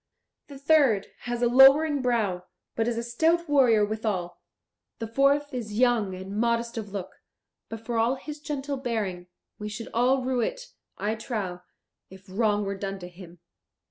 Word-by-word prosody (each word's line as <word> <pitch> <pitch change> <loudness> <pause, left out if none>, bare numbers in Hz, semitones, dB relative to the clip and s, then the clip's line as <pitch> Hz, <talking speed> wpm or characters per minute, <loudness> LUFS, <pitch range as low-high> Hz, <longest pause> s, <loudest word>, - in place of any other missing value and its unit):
The 280 - -10
third 275 -8 +3 0.2
has 240 0 -2
a - - +5
lowering 275 +4 +6
brow, 215 -8 0 0.3
but 225 0 0
is 240 -1 -1
a 235 - -2
stout 325 +8 +1
warrior 250 -8 +4
withal; 205 -5 -3 0.6
the 225 - -4
fourth 275 +5 +2
is 215 -4 -5
young 235 -6 +2
and 190 +2 -7
modest 235 +1 0
of 220 -3 -5
look, 195 -2 -6 0.5
but 225 0 -8
for 235 -1 -1
all 235 +4 +2
his 295 +3 -8
gentle 285 -2 -4
bearing, 210 -9 -3 0.3
we 210 0 -5
should 220 +2 -7
all 255 +3 +2
rue 255 -1 0
it, - - -3 0.3
I 205 +3 -1
trow, 210 -6 -4 0.5
if 190 0 -14
wrong 205 +1 0
were 195 - -2
done 195 0 -4
to 180 -2 -9
him." 175 -1 -14
230 Hz, 170 wpm, -26 LUFS, 205-265 Hz, 0.6 s, lowering